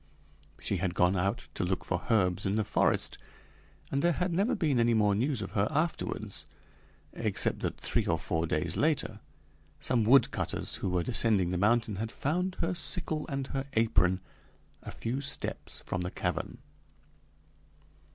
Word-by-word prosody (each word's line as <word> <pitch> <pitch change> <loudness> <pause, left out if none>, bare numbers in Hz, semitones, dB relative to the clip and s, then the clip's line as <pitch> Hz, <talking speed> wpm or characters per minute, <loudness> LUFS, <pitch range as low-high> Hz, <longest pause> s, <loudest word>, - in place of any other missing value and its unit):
She 100 - -1
had 90 0 -1
gone 90 +2 +3
out 100 +5 -1
to - - -2
look 90 +1 -1
for 90 -1 -2
herbs 95 -4 +2
in 100 - +1
the 110 - +2
forest, 105 - +1 0.7
and 140 - +1
there 175 +2 +3
had 180 +2 -1
never 205 +9 +2
been 150 - +1
any 115 0 +3
more 105 -2 +4
news 120 +2 0
of 95 - -6
her 100 -1 +1
afterwards, 155 +2 -2 0.7
except - - 0
that, - - -3
three - - 0
or - - +2
four 80 0 -1
days 80 +1 -1
later, 155 -1 +1 0.6
some 120 -3 +1
woodcutters 130 +5 +2
who - - -2
were 90 -1 +1
descending 105 -6 +2
the 90 - 0
mountain 110 0 +2
had 110 +2 -3
found 180 +6 -1
her 170 +2 +1
sickle 165 -3 0
and 135 -1 -2
her 135 0 -2
apron 95 -5 +3 0.6
a - - -8
few 125 +4 -3
steps 140 - -5
from 90 - -2
the 90 - -2
cavern. 90 -2 -3
110 Hz, 160 wpm, -30 LUFS, 95-140 Hz, 0.7 s, more